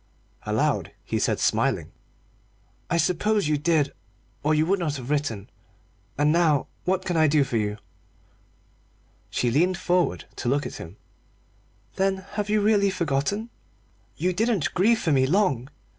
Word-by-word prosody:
Aloud - - 0
he - - -1
said, - - 0
smiling - - +1 1.0
"I 170 - +1
suppose 200 +3 +1
you 150 - +2
did, 150 -2 +1 0.5
or 155 +1 +2
you 155 +1 +3
would 195 +3 +1
not 155 -4 -1
have 130 0 -6
written. 140 -9 -1 0.7
And 145 +1 +3
now 160 -4 +3 0.2
what 185 +1 0
can 175 -2 -1
I 155 -1 +5
do 145 -1 +4
for 130 -3 -2
you?" 105 -1 -1 1.5
She 120 - 0
leaned 175 +8 +2
forward 180 -2 0
to 120 - -2
look 145 +2 +1
at - - -6
him. 85 +5 -10 1.0
"Then 190 -1 0 0.2
you 210 0 +2
really 205 -1 +3
have 190 - -2
forgotten? 170 +9 -1 0.7
You 180 +1 0
didn't 210 -5 0
grieve 225 +6 +3
for 165 - -1
me 130 -2 +3
long! 145 - +1
165 Hz, 150 wpm, -25 LUFS, 140-190 Hz, 1.5 s, I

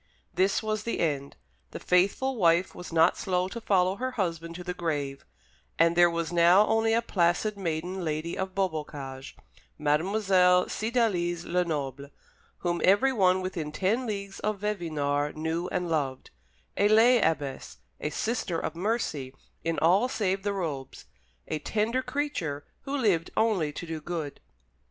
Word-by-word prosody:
This 195 +4 +2
was 215 -1 -1
the 230 +2 -3
end. 140 -4 -1 0.3
The - - -7
faithful 200 +9 +2
wife 175 -3 +3
was 180 0 -9
not 165 +1 +4
slow 180 -1 0
to 235 +3 -7
follow 190 -2 +2
her 255 +3 -2
husband 170 -5 -3
to 180 - -7
the 180 0 -3
grave, 145 -6 -3 0.5
and 165 +1 +4
there 175 0 +6
was 170 0 -3
now 175 +4 +6
only 225 0 +2
a 230 - +1
placid 180 +1 +1
maiden 180 0 -3
lady 155 +1 -2
at 190 -1 -4
Beaubocage, 145 -7 -4 0.4
Mademoiselle 180 +4 +3
Cydalise 200 -7 0
Lenoble, 145 -6 -2 0.6
whom 175 -1 0
everyone 195 -3 +4
within 170 -5 -4
ten 215 +10 0
leagues 200 -2 -5
of 210 0 -1
Vevinord 150 -8 -1
knew 160 +3 -2
and 180 -1 -2
loved, 140 -5 -2 0.5
a 205 - +4
lay 225 +3 +6
abbess, 145 -4 -2 0.2
a - - -2
Sister 180 0 -2
of - - -3
Mercy 165 - -2 0.3
in 165 -1 -1
all 190 +11 +3
save 195 -5 -1
the 205 +1 -1
robes; 150 -9 -5 0.4
a 155 - -2
tender 220 - 0
creature, 230 - -3 0.2
who 280 +1 -2
lived 190 - +1
only 200 -9 +2
to 160 - -7
do 160 -2 -5
good. 160 -3 -5
180 Hz, 150 wpm, -28 LUFS, 160-205 Hz, 0.6 s, there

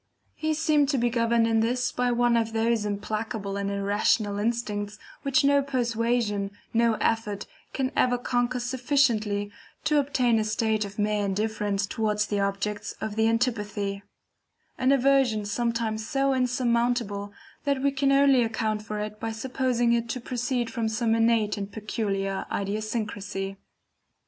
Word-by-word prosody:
He 310 0 -1
seemed 300 -2 +2
to 285 - +1
be 240 -1 +1
governed 230 -1 +2
in 225 -1 +2
this 245 +3 +1
by 250 0 0
one 240 0 +3
of 225 -1 0
those 225 -1 +1
implacable 210 0 -3
and 200 0 -2
irrational 205 +1 +1
instincts, 210 -2 -2 0.2
which 275 +1 +2
no 280 0 +4
persuasion, 235 -5 0 0.2
no 230 -1 +3
effort, 215 -3 -1 0.3
can 265 0 -1
ever 245 -1 +3
conquer 245 0 0
sufficiently 240 -5 +1 0.3
to 300 -1 +3
obtain 250 -5 +2
a - - +1
state 215 0 0
of 200 0 -10
mere 210 0 +1
indifference 205 0 -1
towards 210 0 0
the 205 -1 -1
objects 200 +1 -2
of 215 -1 -4
the 220 0 +3
antipathy; 210 -4 -1 0.7
an 260 +1 +2
aversion 265 -5 +3
sometimes 225 0 -1
so 275 -1 +2
insurmountable, 240 -5 0 0.3
that 280 -2 0
we 280 - +3
can 275 0 +1
only 275 -2 +5
account 220 -2 -1
for 215 0 -5
it 210 0 -5
by 225 +1 -3
supposing 240 0 0
it 235 0 0
to 250 - -2
proceed 245 -1 -2
from 230 -3 -1
some 225 +1 +1
innate 225 -2 +2
and 200 0 -5
peculiar 195 -3 -2
idiosyncrasy. 200 -2 -3
225 Hz, 150 wpm, -26 LUFS, 210-245 Hz, 0.7 s, only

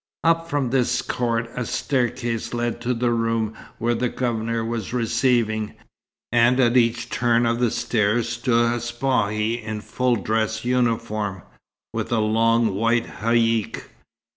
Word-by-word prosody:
Up 165 0 +2
from 140 -4 0
this 130 -2 +1
court 115 -1 -1
a 125 - -2
staircase 120 -2 -1
led 120 0 -2
to 125 +1 -1
the 120 +1 +1
room 115 -1 0 0.2
where 120 +1 0
the 125 +1 0
Governor 115 -2 -2
was 115 -2 -4
receiving, 115 -2 +1 0.6
and 120 +2 +4
at 120 -1 +3
each 115 -1 +2
turn 120 0 +2
of 115 0 +1
the 120 -1 +3
stairs 110 +1 0
stood 120 0 +1
a 120 - -2
Spahi 120 -2 -1
in 110 -1 -4
full 125 +2 0
dress 110 0 -1
uniform, 115 -6 -1 0.5
with - - -3
a 120 - +2
long 115 0 +2
white 115 +3 +1 0.2
haïck. 115 -1 +1
115 Hz, 140 wpm, -23 LUFS, 115-120 Hz, 0.6 s, and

